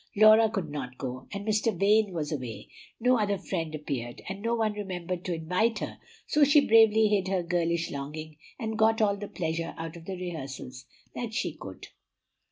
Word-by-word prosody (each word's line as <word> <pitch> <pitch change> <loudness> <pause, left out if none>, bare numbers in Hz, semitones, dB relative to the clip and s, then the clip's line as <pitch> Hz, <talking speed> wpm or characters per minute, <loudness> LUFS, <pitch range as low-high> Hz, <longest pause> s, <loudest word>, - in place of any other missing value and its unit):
Laura 215 +1 +7
could 190 -8 -3
not 130 -4 -5
go, 130 -1 -5
and 200 0 -5
Mr. 215 -2 +1
Vane 210 +1 +4
was 160 -4 -3
away; 125 -7 -5 0.3
no 250 +1 +3
other 205 -1 +1
friend 165 -5 -3
appeared, 130 -6 -4
and 195 +1 -5
no 230 +2 0
one 220 -2 +1
remembered 180 -3 -4
to 180 - -1
invite 180 +8 +1
her, - - -5 0.3
so 300 - +3
she 285 0 +6
bravely 220 -1 +6
hid 200 -3 +1
her 185 -2 0
girlish 170 -1 0
longing, 150 +2 -6 0.2
and 220 -3 -4
got 225 0 +4
all 205 -2 +3
the 205 0 -6
pleasure 165 -2 -3
out 165 +1 -6
of 165 -1 -11
the 190 - -4
rehearsals 135 -7 -6 0.3
that 230 -3 -5
she - - -1
could. - - -10
185 Hz, 185 wpm, -28 LUFS, 160-215 Hz, 0.3 s, Laura